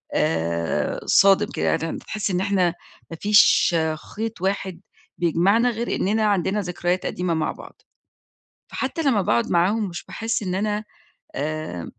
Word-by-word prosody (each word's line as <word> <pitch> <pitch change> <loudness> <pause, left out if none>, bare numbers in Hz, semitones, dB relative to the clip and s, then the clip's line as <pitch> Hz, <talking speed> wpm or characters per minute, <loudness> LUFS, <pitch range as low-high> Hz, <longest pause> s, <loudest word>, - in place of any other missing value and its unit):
آآ 85 0 0
صادم 195 -1 +5
كده، - - -2
يعني 165 0 0
أنت - - -6
تحس 210 -2 -3
إن 180 - 0
إحنا 190 -3 +1 0.4
ما 165 - -6
فيش 205 -4 +5 0.4
خيط 220 -3 -4
واحد 190 -2 -2 0.4
بيجمعنا 185 +8 +2
غير 235 +1 -2
إنّنا 215 +3 +1
عندنا 200 0 +1
ذكريات 180 0 -2
قديمة 180 -1 -1
مع 160 -1 -1
بعض. - - -13 0.9
فحتّى 270 +5 -2
لمّا 245 -9 +2
باقعد 120 -9 +1
معاهم 195 +4 +2
مش 170 - -7
باحس 225 0 -3
إن 180 -1 -2
أنا 210 +2 -1 0.5
آآ 155 - -4
190 Hz, 145 wpm, -23 LUFS, 170-210 Hz, 0.9 s, صادم